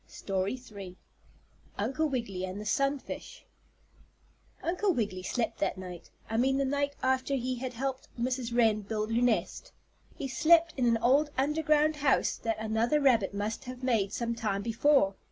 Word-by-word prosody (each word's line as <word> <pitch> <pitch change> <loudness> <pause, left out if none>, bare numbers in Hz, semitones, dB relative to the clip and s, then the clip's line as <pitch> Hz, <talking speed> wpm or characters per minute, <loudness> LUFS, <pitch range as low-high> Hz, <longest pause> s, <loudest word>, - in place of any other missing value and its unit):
STORY 195 +1 -2 0.2
III 190 -3 -9 0.8
UNCLE 270 +9 0
WIGGILY 230 -9 -3
AND 185 +2 -4
THE 210 - -7
SUNFISH 275 +5 -2 1.2
Uncle 365 +1 +1
Wiggily 205 -6 -2
slept 230 +5 -2
that 195 -1 0
night 180 -2 -9 0.2
I 225 - -2
mean 265 +3 +3
the 275 - +1
night 285 +1 -1
after 260 +1 +1
he 255 0 -1
had 255 +1 -4
helped 265 +2 -3
Mrs. 250 0 -1
Wren 225 -3 +3
build 215 +2 -3
her 235 - +2
nest 245 - 0 0.4
he 275 - -4
slept 330 +6 +4
in 250 -3 +1
an 230 -1 +4
old 280 +5 +4
under 300 +4 +1
ground 305 0 +3
house 280 -2 +2
that 225 -1 -2
another 220 +6 +1
rabbit 230 -8 +3
must 210 +5 -3
have 255 0 -8
made 220 -6 +1
some 235 -1 -2
time 210 -4 -2
before. 235 -2 +3
245 Hz, 165 wpm, -30 LUFS, 215-275 Hz, 1.2 s, slept